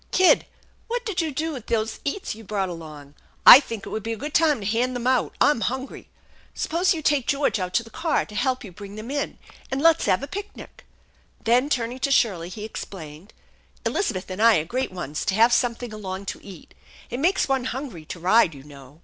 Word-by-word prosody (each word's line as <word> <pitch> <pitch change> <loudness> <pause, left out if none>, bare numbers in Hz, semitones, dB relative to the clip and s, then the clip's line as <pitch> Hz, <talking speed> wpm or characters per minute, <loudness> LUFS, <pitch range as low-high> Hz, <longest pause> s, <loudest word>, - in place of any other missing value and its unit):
" - - -36
Kid, 370 - +5 0.4
what 480 0 -3
did 400 -5 -1
you 320 - -1
do 315 +4 -2
with 255 -7 -8
those 220 -1 -1
eats 325 +8 -3
you 225 +1 -12
brought 195 -2 -2
along? 155 -4 -9 0.3
I 255 - +13
think 230 -7 -7
it - - -7
would 220 - -3
be 225 +2 -3
a - - -6
good 295 +6 -6
time 305 -7 +3
to - - -6
hand 240 +4 0
them 245 -1 -4
out. 255 -1 +1
I'm 290 -6 +3
hungry. 260 +3 -4 0.5
Suppose 345 +3 +1
you 320 -3 -1
take 280 -4 +2
George 280 -6 +1
out 180 0 -4
to 230 - +3
the 225 - -15
car 325 0 0
to 210 - -14
help 255 +4 0
you 200 - -9
bring 200 +2 -10
them 215 +4 -7
in, 285 0 -3 0.3
and 265 - -2
let's 330 +2 +4
have 185 +8 +2
a - - -4
picnic! 405 +4 -9 0.3
" - - -35
Then, 245 +5 +3
turning 245 -2 -1
to 275 - 0
Shirley, 190 -11 +2
he 210 +3 -7
explained: 170 -4 -9 0.3
" - - -34
Elizabeth 190 - -1
and 185 +3 -4
I 230 -1 +6
are 155 - -1
great 255 +7 -2
ones 155 -5 -5
to 190 - 0
have 230 +3 +5
something 240 -2 0
along 195 -2 -6
to - - -18
eat. 190 -5 -12 0.4
It 245 - -3
makes 355 +7 +2
one 265 -2 0
hungry 255 - -5
to 170 - -7
ride, 180 -2 +4
you 135 - -12
know." 140 0 -14
230 Hz, 230 wpm, -24 LUFS, 190-275 Hz, 0.5 s, I